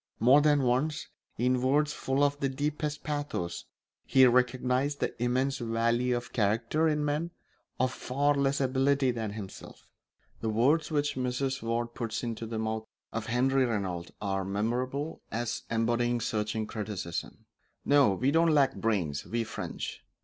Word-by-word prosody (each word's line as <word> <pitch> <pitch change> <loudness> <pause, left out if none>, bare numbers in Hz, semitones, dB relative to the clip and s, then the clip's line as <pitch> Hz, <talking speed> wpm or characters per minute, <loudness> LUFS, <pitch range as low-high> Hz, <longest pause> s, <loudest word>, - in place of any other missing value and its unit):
More 130 +6 +6
than 145 -2 +3
once, 135 +5 0 0.3
in 125 +1 +2
words 145 +3 +2
full 135 +2 0
of 145 0 +1
the 135 - 0
deepest 150 +2 -2
pathos, 145 - -3 0.4
he 130 -1 +5
recognised 125 +3 +2
the - - -1
immense 130 +3 +1
value 120 +1 +1
of 120 - -8
character 115 +9 +1
in 150 -1 +1
men 150 +3 -1 0.5
of 130 0 +1
far 140 +4 +1
less 140 -1 +1
ability 135 0 +2
than 110 -3 -4
himself. 105 -3 -9 0.5
The 110 - -2
words 140 +9 +2
which 145 -2 0
Mrs. 130 +1 -2
Ward 115 +1 -2
puts 115 -1 -3
into 115 -1 -4
the 110 0 -4
mouth 110 0 -2 0.3
of 115 -1 -3
Henri 130 +3 +2
Regnault 95 -7 -2
are 95 -2 -1
memorable 125 +10 -2
as 115 +1 -2
embodying 120 +1 +1
searching 110 0 -1
criticism: 105 -6 -5 0.4
"No, 140 -9 +5
we 130 +7 +1
don't 165 +2 +4
lack 145 -3 +4
brains, 90 -11 -1
we 115 0 -1
French. - - -6
125 Hz, 150 wpm, -29 LUFS, 115-140 Hz, 0.5 s, More